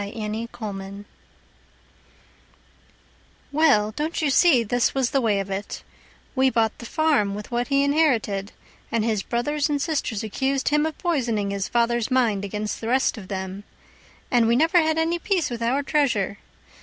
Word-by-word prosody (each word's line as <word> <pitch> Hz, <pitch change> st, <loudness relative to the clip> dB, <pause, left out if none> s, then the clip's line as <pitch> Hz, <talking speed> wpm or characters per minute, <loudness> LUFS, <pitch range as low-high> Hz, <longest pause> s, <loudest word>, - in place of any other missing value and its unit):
Nancy 215 Hz, +2 st, -4 dB
Knapp 200 Hz, -2 st, -7 dB, 2.5 s
Well, 280 Hz, -9 st, +3 dB
don't 300 Hz, +8 st, -3 dB
you 300 Hz, -3 st, +1 dB
see 270 Hz, -5 st, +5 dB
this 245 Hz, +4 st, 0 dB
was 265 Hz, -3 st, +1 dB
the 275 Hz, -, +2 dB
way 210 Hz, -4 st, +1 dB
of 195 Hz, 0 st, -4 dB
it: 195 Hz, +1 st, -5 dB, 0.5 s
We 265 Hz, 0 st, +3 dB
bought 225 Hz, -3 st, +1 dB
the 235 Hz, -, -8 dB
farm 285 Hz, -12 st, +1 dB
with 210 Hz, +3 st, -8 dB
what 240 Hz, 0 st, -1 dB
he 275 Hz, 0 st, +2 dB
inherited, 245 Hz, -10 st, +1 dB, 0.4 s
And 230 Hz, -2 st, 0 dB
his 220 Hz, -3 st, 0 dB
brothers 290 Hz, +8 st, -1 dB
and 290 Hz, -1 st, 0 dB
sisters 280 Hz, -9 st, -2 dB
accused 265 Hz, +6 st, -1 dB
him 300 Hz, +1 st, +2 dB
of 315 Hz, -, -6 dB
poisoning 235 Hz, -, -1 dB
His 200 Hz, -1 st, -2 dB
father's 235 Hz, -1 st, +1 dB
mind 235 Hz, -6 st, +1 dB
against 210 Hz, +1 st, -4 dB
the 225 Hz, -, -4 dB
rest 260 Hz, +3 st, +2 dB
of 205 Hz, -5 st, -10 dB
them. 190 Hz, 0 st, -5 dB, 0.7 s
And 240 Hz, -3 st, +4 dB
we 235 Hz, -, +3 dB
never 325 Hz, +6 st, +4 dB
had 315 Hz, 0 st, 0 dB
any 330 Hz, +2 st, +1 dB
peace 365 Hz, -, 0 dB
with 235 Hz, -1 st, -5 dB
our 255 Hz, +5 st, +1 dB
treasure. 235 Hz, -10 st, 0 dB
235 Hz, 165 wpm, -24 LUFS, 210-285 Hz, 2.5 s, see